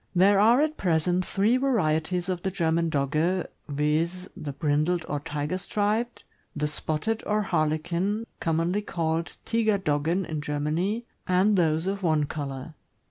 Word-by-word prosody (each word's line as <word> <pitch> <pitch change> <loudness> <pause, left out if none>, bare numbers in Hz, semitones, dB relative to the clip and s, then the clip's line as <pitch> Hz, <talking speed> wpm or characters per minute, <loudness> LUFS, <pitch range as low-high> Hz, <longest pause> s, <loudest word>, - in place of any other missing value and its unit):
There 195 +2 +5
are 230 +6 +6
at 310 0 -1
present 175 +1 +1
three 210 +7 +2
varieties 180 - +1
of 180 -2 -2
the 190 - -1
German 165 -2 +1
Dogge, 155 +6 +1 0.2
viz., 155 +5 0
the 145 - -5
brindled 155 +4 0
or 145 - -2
tiger 150 +3 -3
striped, 215 +5 -1 0.3
the 150 0 0
spotted 160 +9 -2
or 210 0 +1
Harlequin, 170 +6 0
commonly 165 +5 0
called 165 -3 -2
Tiger 220 -2 +2
doggen 165 +1 0
in 155 -2 -4
Germany, 155 +10 -1 0.2
and 185 +3 +3
those 160 -2 +2
of 195 +1 -2
one 155 -4 +2
color. 140 0 -5
170 Hz, 140 wpm, -26 LUFS, 155-195 Hz, 0.3 s, are